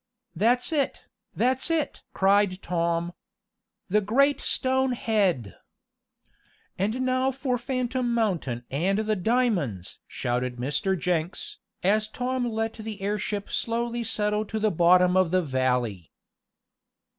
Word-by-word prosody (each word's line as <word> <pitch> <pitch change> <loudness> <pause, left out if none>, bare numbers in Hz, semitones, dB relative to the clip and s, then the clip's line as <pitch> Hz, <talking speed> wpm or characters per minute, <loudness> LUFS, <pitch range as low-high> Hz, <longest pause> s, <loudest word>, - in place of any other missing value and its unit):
"That's 245 - +2
it! 285 -3 -1 0.3
That's 260 +5 +1
it!" 325 -3 -1
cried 195 -1 +2
Tom. 170 0 -1 0.7
"The 210 +3 +2
great 275 +7 +2
stone 260 -1 +1
head!" 195 - 0 1.2
"And 215 +7 -1
now 255 +1 +1
for 260 -2 -2
Phantom 255 -1 -1
Mountain 180 - -1
and 180 +9 +1
the 215 0 0
diamonds!" 190 - 0
shouted 125 0 -2
Mr. 145 +10 -1
Jenks, 175 -1 -2 0.2
as 210 +3 +2
Tom 250 +2 -2
let 225 0 -2
the 220 -2 -7
airship 205 0 -3
slowly 235 +1 -1
settle 210 -1 0
to 220 - -4
the 215 0 +1
bottom 180 +1 +5
of 185 -2 +4
the 185 +1 +2
valley. 125 - -1
210 Hz, 120 wpm, -26 LUFS, 175-245 Hz, 1.2 s, bottom